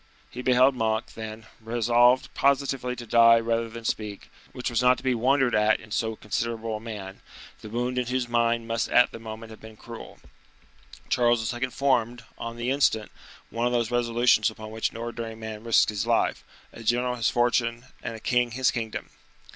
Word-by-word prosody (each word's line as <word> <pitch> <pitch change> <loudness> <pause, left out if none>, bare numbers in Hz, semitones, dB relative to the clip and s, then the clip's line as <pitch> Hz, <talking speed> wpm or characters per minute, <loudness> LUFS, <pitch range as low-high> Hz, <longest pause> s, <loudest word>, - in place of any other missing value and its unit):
He 125 - -6
beheld 130 +1 +4
Monk, 110 -2 -1
then, 110 0 -8
resolved 120 +2 +2
positively 135 -2 +1
to 120 - -8
die 115 0 +6
rather 115 0 -1
than 115 0 -9
speak, 105 -2 -4 0.2
which 125 0 -4
was 120 - +1
not 125 0 +5
to - - -11
be 130 -1 +2
wondered 130 +2 +2
at 105 0 +3
in 110 - -15
so 110 0 -1
considerable 115 +1 -3
a - - -9
man, 105 -4 -8 0.4
the 110 - -10
wound 125 +3 -1
in 125 - -2
whose 125 -1 -1
mind 115 -1 +1
must 115 0 -1
at 125 0 +5
the - - -9
moment 110 0 -8
have 110 - -12
been 110 -1 -12
cruel. 115 +1 -10 0.9
Charles 120 -1 +2
II. 120 +2 -2
formed, 125 -3 0 0.2
on 115 0 -6
the 120 +2 -1
instant, 125 -6 +1 0.4
one 115 +1 0
of 125 - -1
those 120 -1 0
resolutions 120 -2 +3
upon 110 0 -10
which 110 0 -1
an - - -11
ordinary 115 -1 -5
man 110 -1 -7
risks 115 -2 +3
his 105 -2 -3
life, - - +1 0.3
a - - -10
general 120 +2 +1
his 120 -3 +1
fortune, 120 0 +1 0.2
and 115 -2 -5
a - - -8
king 125 +2 +1
his 130 +1 +2
kingdom. 115 -2 -5
115 Hz, 190 wpm, -26 LUFS, 110-125 Hz, 0.9 s, die